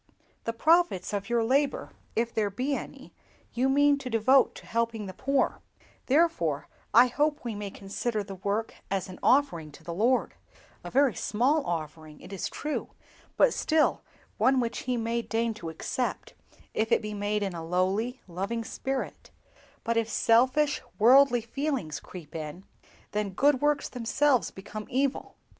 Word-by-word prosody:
The 230 - 0
profits 315 - +2
of 200 +1 -3
your 235 -1 +2
labor, 275 +4 +1 0.2
if 230 0 0
there 210 -2 +1
be 255 +8 -2
any, - - -8 0.4
you 255 +3 +1
mean 285 +1 +4
to 260 - -6
devote 250 +4 +4
to - - -11
helping 230 -2 -1
the 190 - -7
poor; 275 +7 0 0.5
therefore 255 - +2 0.2
I 240 +3 +8
hope 295 +4 +1
that - - -24
we 235 - -2
may 205 -1 -5
consider 205 +3 -3
the 195 - -8
work 200 +4 -2 0.2
as 195 -1 -1
an 185 - -10
offering 250 - +2
to - - -15
the 170 - -5
Lord—a 235 +8 -2
very 275 -3 +3
small 270 +8 +1
offering, 155 -2 -5
it 200 - -11
is 195 - -3
true, 300 0 -4 0.5
but - - +5
still 315 -1 +2 0.4
one 260 0 +4
which 235 -2 -1
He 250 - +1
may 230 +1 -1
deign 230 0 -1
to 175 -6 -7
accept, 245 +10 -3 0.4
if 220 +2 -1
it - - +3
be 210 0 -4
made 205 0 -1
in 195 -2 -2
a 165 -1 -6
lowly, 190 +9 0
loving 195 +6 -3
spirit; 265 +3 -4 0.5
but 230 0 0
if 225 -1 +1
selfish, 260 +7 +3 0.2
worldly 245 +2 +6
feelings 235 - -3
creep 170 -2 -11
in, 155 +3 -6 0.5
then 210 -2 -2
good 280 +5 +3
works 295 -1 +2
themselves 250 +2 +1
become 210 +2 -8
evil. 270 +2 -1
230 Hz, 160 wpm, -28 LUFS, 200-270 Hz, 0.5 s, I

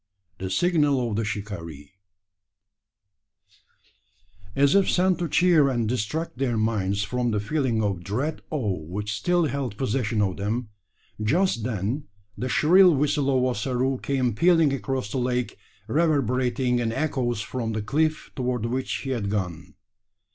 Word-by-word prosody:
The 95 - -4
signal 145 - +2
of - - -2
the 115 - 0
Shikaree. 100 -9 -6 2.6
As 140 +1 +4
if 200 -1 +4
sent 185 0 +2
to 170 -2 -2
cheer 165 -4 +4
and 120 -4 0
distract 125 +6 -3
their 125 -4 0
minds 100 -3 0
from 125 +4 -1
the 105 -2 0
feeling 120 -1 0
of 95 -4 -2
dread 130 - -2
awe 110 - -1
which 100 +7 -4
still 175 +10 +1
held 130 -6 -3
possession 115 -3 -1
of 95 -2 -1
them, 110 +3 -2 0.5
just 155 - +1
then 115 +5 -2 0.3
the 125 +5 -3
shrill 175 +5 +6
whistle 145 0 +1
of 130 -2 +2
Ossaroo 130 +2 0
came 130 -4 0
pealing 165 - +4
across 130 -3 -3
the 130 - -1
lake, 125 -1 -1 0.3
reverberating 125 -4 +1
in 115 -1 0
echoes 130 -4 -1
from 115 0 -3
the 110 - -2
cliff 155 +7 0
toward 125 -3 -1
which 125 +3 -2
he 135 - -4
had 110 -6 -2
gone. 90 -6 -4
125 Hz, 145 wpm, -25 LUFS, 105-140 Hz, 2.6 s, shrill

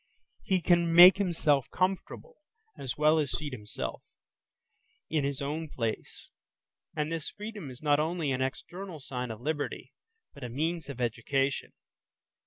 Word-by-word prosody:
He 190 -3 +1
can 170 -1 +3
make 175 +3 +10
himself 155 -8 +2
comfortable 195 - -2 0.4
as 130 - -5
well 155 +1 +4
as 145 -3 0
seat 135 +4 -3
himself 105 -4 -5 1.1
in 155 -2 +1
his 140 0 -2
own 155 +3 -3
place. 115 -5 -4 0.7
And 150 0 -1
this 165 -2 -3
freedom 210 -7 -7
is 130 +3 -12
not 145 -1 +4
only 160 -2 0
an 130 0 -1
external 175 +6 -5
sign 125 -2 -5
of 110 0 -7
liberty, 150 +1 -3 0.4
but 140 - -11
a 125 - -4
means 155 +4 -2
of 135 -3 -7
education. 130 +3 -1
150 Hz, 145 wpm, -30 LUFS, 130-170 Hz, 1.1 s, make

